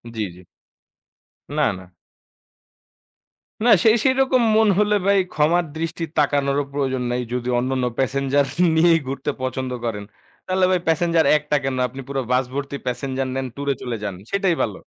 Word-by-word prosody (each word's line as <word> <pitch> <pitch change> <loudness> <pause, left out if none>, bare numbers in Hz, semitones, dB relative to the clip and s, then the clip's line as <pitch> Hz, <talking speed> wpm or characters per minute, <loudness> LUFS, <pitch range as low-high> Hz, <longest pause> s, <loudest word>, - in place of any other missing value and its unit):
জি, 110 - -3
জি। - - -15 1.2
না, 150 - +3
না। 90 -1 -14 1.8
না - - +5 0.2
সেই 220 +1 +6
সেরকম 260 -1 +3
মন 220 0 +4
হলে 210 0 +3
ভাই 200 0 +4 0.2
ক্ষমার 165 +3 +2
দৃষ্টি 165 +1 -3
তাকানোরও 140 0 +2
প্রয়োজন 130 -3 -1
নাই। 125 0 -1
যদি 125 0 -2
অন্যান্য 130 0 -1
প্যাসেঞ্জার 140 +1 +1 0.3
নিয়েই 165 0 +5
ঘুরতে 135 +2 -3
পছন্দ 130 0 -3
করেন। 105 -3 -3 0.4
তাহলে 185 0 +2
ভাই 180 - +2
প্যাসেঞ্জার 165 -1 +2
একটা 150 0 -2
কেন? 135 -1 -1
আপনি 135 +3 -9
পুরো 135 -1 -2
বাস 130 0 +2
ভর্তি 140 0 -4
প্যাসেঞ্জার 130 +1 -2
নেন 135 -1 -2
টুরে 140 0 -1
চলে 120 -3 -3
যান। 100 -3 -3 0.2
সেটাই 195 -4 +1
ভালো। 105 -4 -2
140 Hz, 155 wpm, -22 LUFS, 130-170 Hz, 1.8 s, সেই